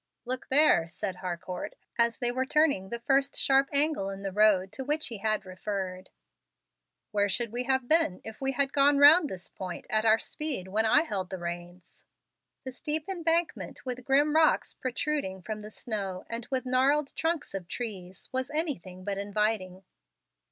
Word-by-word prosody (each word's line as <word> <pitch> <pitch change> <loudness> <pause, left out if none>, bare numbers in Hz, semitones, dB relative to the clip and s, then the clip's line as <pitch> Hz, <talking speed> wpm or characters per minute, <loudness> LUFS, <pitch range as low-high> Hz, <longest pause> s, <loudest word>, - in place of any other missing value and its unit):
"Look 255 +1 -3
there," 280 - +5
said 180 +2 -5
Harcourt, 180 0 -5 0.2
as 235 -1 +2
they 245 -2 -1
were 255 +1 0
turning 280 -9 +2
the 235 - -3
first 275 +2 +1
sharp 270 0 +3
angle 285 -8 +1
in 195 0 -7
the 195 - -3
road 195 -2 +3
to 225 +6 -6
which 300 +2 -1
he 225 -4 -6
had 215 -1 0
referred. 185 0 -5 1.0
"Where 205 -1 +1
should 230 +3 -2
we 245 +2 -2
have 260 -1 +1
been 315 - +3
if 220 +2 -9
we 270 0 0
had 275 +1 +2
gone 285 0 +5
round 295 +2 +7
this 180 -1 -8
point 185 -2 -7
at 215 0 +2
our 220 0 +5
speed 275 -8 -3
when 215 +4 +1
I 295 +7 +5
held 195 - -4
the 190 - -5
reins?" 175 0 -8 0.6
The 260 - -6
steep 300 +4 -3
embankment, 335 -5 -1
with 255 0 -4
grim 290 +4 +3
rocks 320 0 +3
protruding 255 -7 -3
from 215 +1 -5
the 210 - -9
snow 200 -4 -4
and 230 0 -4
with 260 -1 -2
gnarled 270 +3 +2
trunks 325 -1 -2
of 190 -3 -5
trees, 190 -5 -6
was 260 0 -1
anything 265 - -3
but 200 0 -3
inviting. 200 -2 -1
235 Hz, 175 wpm, -28 LUFS, 190-280 Hz, 1.0 s, round